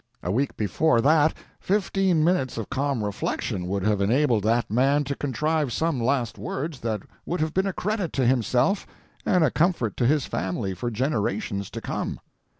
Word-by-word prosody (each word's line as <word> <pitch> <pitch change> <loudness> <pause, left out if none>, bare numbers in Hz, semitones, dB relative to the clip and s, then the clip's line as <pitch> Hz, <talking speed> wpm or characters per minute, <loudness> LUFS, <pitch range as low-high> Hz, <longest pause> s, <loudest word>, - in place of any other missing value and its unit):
A 90 - -1
week 130 +7 0
before 115 - +2
that 155 +4 +4 0.2
fifteen 190 -4 +1
minutes 160 -8 +1
of 115 - -5
calm 135 -4 0
reflection 95 -2 -2
would 100 +1 -1
have 105 -1 +1
enabled 120 +2 +3
that 115 -1 +1
man 135 +5 +3
to 140 0 -2
contrive 150 +1 -1
some 160 -2 0
last 120 -3 0
words 135 +7 -4
that 110 -3 -2 0.2
would 175 - -3
have 155 0 -1
been 190 +1 +1
a - - 0
credit 205 -3 -2
to 130 - +1
himself 125 - +2 0.4
and 180 -3 +4
a 145 - +3
comfort 160 - +1
to 120 - +2
his 145 -1 +2
family 95 +2 -2
for 120 +7 -3
generations 120 - -1
to - - -6
come. - - -3
135 Hz, 175 wpm, -25 LUFS, 110-160 Hz, 0.4 s, that